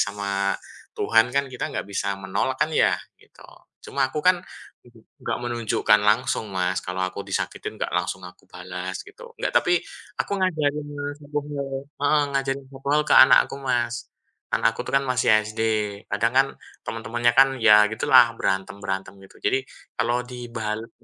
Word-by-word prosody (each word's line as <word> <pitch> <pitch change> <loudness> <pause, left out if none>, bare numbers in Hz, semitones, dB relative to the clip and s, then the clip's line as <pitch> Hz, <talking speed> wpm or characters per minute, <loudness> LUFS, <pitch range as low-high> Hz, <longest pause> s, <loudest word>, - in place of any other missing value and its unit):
sama 100 -1 -1 0.4
Tuhan 115 +1 +3
kan 140 0 +2
kita 130 -2 -5
nggak - - -4
bisa 100 0 -2
menolak 100 +7 -2
kan 155 +1 +1
ya, - - +4 0.3
gitu. - - -18 0.4
Cuman 135 -1 -1
aku 150 - -4
kan 180 -1 +4 0.8
nggak 115 - -2
menunjukkan 115 -3 +2
langsung 110 0 +1
Mas, 95 -1 -1
kalau 90 +1 -4
aku 95 +2 -6
disakitin - - -4
nggak - - -3
langsung 90 +1 -2
aku 90 - -15
balas 90 +1 -6
gitu, - - -13
nggak - - -2
tapi 175 - +4 0.4
aku - - -2
ngajarin 150 -5 0 0.4
pukul 140 -2 -4 0.2
heeh 145 +1 +3
ngajarin 135 0 -1
pukul 140 +3 0
ke - - +1
anak 130 - +8
aku 140 - -8
Mas. 120 -2 -1 0.4
Anak - - +2
aku - - -4
tuh - - -7
kan 135 - -5
masih 125 -2 +2 0.2
SD, 110 +1 -6 0.5
kadang 115 +3 +1
kan 135 +1 +5 0.4
teman-temannya 120 +1 0
kan, 135 - +8
ya 105 -1 +7
gitulah 110 - +5
berantem-berantem 95 0 -3
gitu. 95 - -17
Jadi, 130 - 0 0.3
kalau 120 +2 0
dibales 115 -3 -5
120 Hz, 155 wpm, -24 LUFS, 100-135 Hz, 0.8 s, anak